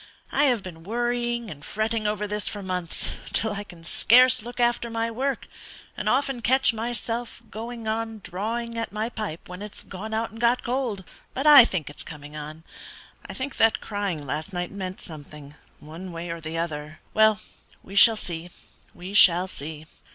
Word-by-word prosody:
I 290 - +4
have 245 -7 +2
been 170 -3 -9
worrying 240 +1 -1
and 145 -1 -10
fretting 215 +6 -1
over 210 0 -1
this 210 0 -2
for 205 -1 -4
months, 180 -2 -3 0.2
till 220 -1 +2
I 205 0 -4
can 175 -5 -14
scarce 255 +8 +5
look 240 +2 -8
after 240 0 +2
my 230 0 -1
work, 270 +4 -2 0.5
and - - -1
often 270 -1 +1
catch 260 +2 +4
myself 235 +1 -3
going 230 +1 -6
on 225 0 -2
drawing 230 +5 -3
at 230 - -3
my 215 +2 -2
pipe 215 -8 -5
when 180 +2 -8
it's 210 -1 -7
gone 200 +3 -7
out 225 +1 -1
and 225 +1 -10
got 240 +1 +3
cold. 240 -6 -1 0.3
But 270 - -2
I 290 -5 +11
think 180 - -2
it's 145 - -8
coming 150 -1 -9
on; 155 +1 -7 0.7
I - - -6
think 265 +1 -4
that 225 0 +4
crying 200 -8 -3
last 155 +7 -4
night 180 -1 -3
meant 190 -2 -5
something, 150 -2 -10 0.3
one 165 +5 -9
way 170 0 -5
or 165 0 -5
the 160 +1 -4
other. 155 -2 -4
Well, 220 -1 +5 0.4
we 195 - -10
shall 225 +2 +8
see; 170 -3 -5 0.5
we 185 +3 -8
shall 180 -2 +7
see. 155 -2 -7
210 Hz, 180 wpm, -26 LUFS, 170-235 Hz, 0.7 s, I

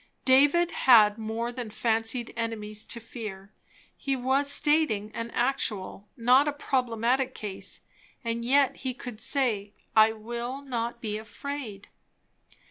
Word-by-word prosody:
David 290 +7 +5
had 215 -4 +5
more 225 +2 -3
than 245 -2 -6
fancied 225 +2 -1
enemies 215 -2 -4
to 235 - -3
fear; 210 -4 -8 0.4
he 275 -1 -2
was 265 +3 +2
stating 295 -11 +2
an 230 0 -4
actual, 230 -6 -2
not 255 +4 +5
a - - +2
problematical 255 -1 0
case; 205 -3 -4 0.4
and 230 0 -2
yet 275 +3 +3
he 255 -2 -4
could 245 -4 -8
say 220 -7 0 0.2
"_I 220 0 +5
will 240 +5 -5
not 235 -3 -3
be 215 -2 -3
afraid"! 220 -1 -7
235 Hz, 125 wpm, -27 LUFS, 215-265 Hz, 0.4 s, David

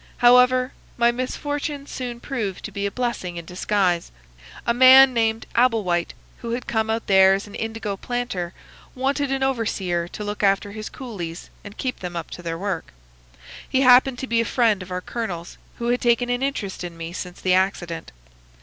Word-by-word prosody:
However, 250 +1 +5 0.2
my 235 0 +4
misfortune 285 +3 -3
soon 245 -4 -6
proved 220 -9 -4
to 215 - -6
be 200 0 -2
a - - -5
blessing 235 -7 -3
in 170 - -6
disguise. 180 -1 0 0.5
A 235 - +2
man 260 +1 +8
named 225 -1 0
Abel 235 -3 +3
White, 175 -2 -1 0.2
who 235 -1 -5
had 245 +1 -3
come 220 -1 -1
out 225 +1 -1
there 190 -1 +6
as 195 - -4
an 205 - -13
indigo 225 -2 -4
planter, 240 -8 -3 0.4
wanted 275 +2 0
an 270 0 0
overseer 195 -9 -1
to 210 - -7
look 205 0 -4
after 200 0 +2
his 215 0 -6
coolies 180 -10 -7
and 205 0 -11
keep 255 -1 -3
them 180 -1 -6
up 170 -2 -5
to - - -7
their 165 -1 -4
work. 190 -2 -4 0.8
He 260 - +2
happened 255 0 +6
to 265 - -4
be 230 -2 +1
a - - +1
friend 225 -3 +2
of 185 - -9
our 180 0 -3
colonel's, 180 -7 -5 0.2
who 235 0 -2
had 245 0 +1
taken 245 0 +2
an 245 +1 -1
interest 215 -10 -3
in 170 -1 -7
me 165 +1 -6
since 180 0 -7
the 185 - +2
accident. 185 - -1
220 Hz, 190 wpm, -23 LUFS, 185-250 Hz, 0.8 s, man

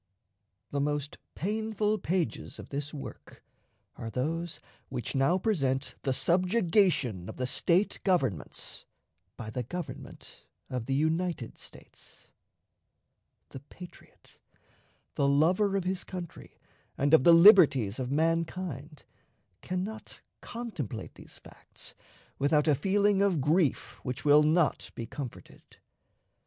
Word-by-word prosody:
The 140 - 0
most 145 0 -2 0.2
painful 215 +2 -1
pages 175 -1 -2
of - - -10
this 145 +1 -4
work 145 - -10 0.5
are 115 - -6
those 160 +8 -3 0.3
which 125 -4 -4
now 135 +7 +3
present 140 - 0
the 135 - -1
subjugation 175 - +2
of - - -8
the 125 - -1
State 175 +9 +1
governments 135 - -1 0.5
by 110 -2 -7
the 125 - -3
Government 175 +7 -8 0.2
of 125 -3 -3
the 135 - 0
United 160 -3 -1
States. - - -15 1.2
The 135 - -9
patriot, 175 +5 -15 0.7
the 140 - +1
lover 180 +8 +3
of 195 - -1
his 185 0 -2
country 180 -3 -9 0.4
and 145 +2 +1
of 160 - +7
the 170 - +7
liberties 165 - +7
of 125 -1 -3
mankind, 160 -1 -2 0.6
can 185 0 -2
not 215 +2 -8 0.2
contemplate 225 - -6
these - - -15
facts - - -12 0.5
without 150 +2 +2
a 150 - +5
feeling 200 +6 +2
of 195 -5 +2
grief 150 +2 +1
which 125 +3 -5
will 145 +1 +7
not 155 +1 +2
be 115 - -5
comforted. 125 +1 -8
160 Hz, 120 wpm, -29 LUFS, 135-185 Hz, 1.2 s, of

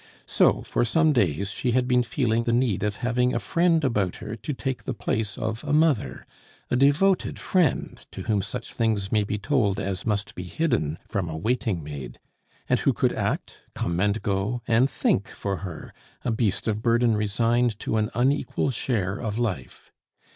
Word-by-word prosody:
So, - - +3
for - - 0
some 155 +6 +3
days, 100 - +1
she 120 +2 -1
had 125 0 +2
been 125 -1 +4
feeling 115 -1 0
the 115 - +1
need 120 -5 +1
of 105 -1 -1
having 125 +1 +1
a - - +1
friend 165 +3 +2
about 105 -9 +1
her 110 +1 -6
to 115 - -5
take 125 -3 -4
the 130 - -3
place 105 -2 -2
of 110 +3 -3
a 145 -1 -1
mother 155 -5 +2 0.5
a - - +3
devoted 145 +9 +3
friend, 180 -7 0
to - - -7
whom 105 -3 +1
such 115 +6 -5
things 110 -4 0
may 105 -2 +3
be 105 +1 -2
told 105 -2 +1
as 95 -2 -3
must 105 -2 -1
be - - -6
hidden 90 - -1
from 95 -5 -2
a 80 - -4
waiting 110 -2 -1
maid, 70 -5 -7 0.5
and - - +2
who - - +2
could - - +1
act, - - -2 0.2
come 85 0 -1
and 105 +3 +1
go, 100 +4 -1
and 120 +4 +4
think 100 - +1
for 100 -1 -4
her, 90 -5 -8 0.3
a 120 - +1
beast 110 -3 0
of 110 -1 0
burden 115 0 +3
resigned 115 +2 +1
to 110 - -1
an 110 0 +1
unequal 135 +2 +1
share 105 -6 -1
of 110 -1 -3
life. 95 - -4
110 Hz, 185 wpm, -25 LUFS, 100-125 Hz, 0.5 s, been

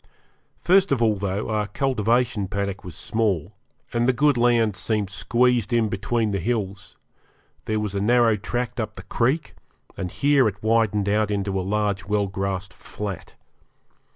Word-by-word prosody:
First 190 0 +4
of 135 - +2
all, 110 -2 +3
though 100 +2 -2
our 105 -1 0
cultivation 120 -4 0
paddock 100 0 -3
was 90 -4 -9
small, 105 -8 -1 0.4
and 120 +1 +2
the - - +4
good 145 +2 +3
land 120 -3 +3
seemed 100 0 -2
squeezed 120 +2 +1
in 115 -2 +2
between 110 +2 -1
the 100 - -1
hills, 100 -2 -3 0.7
there 110 0 0
was 105 -2 -3
a 100 - -1
narrow 115 +1 +4
tract 120 +4 -3
up 110 -1 -3
the 95 - -9
creek, 125 - 0 0.4
and 90 -2 -4
here 140 +3 +3
it 105 0 -5
widened 110 -2 +2
out 105 +1 +2
into 100 -1 -1
a - - -1
large 100 0 -1
well 105 0 +1
grassed 95 -1 -3
flat. 100 -3 -7
105 Hz, 160 wpm, -24 LUFS, 100-120 Hz, 0.7 s, First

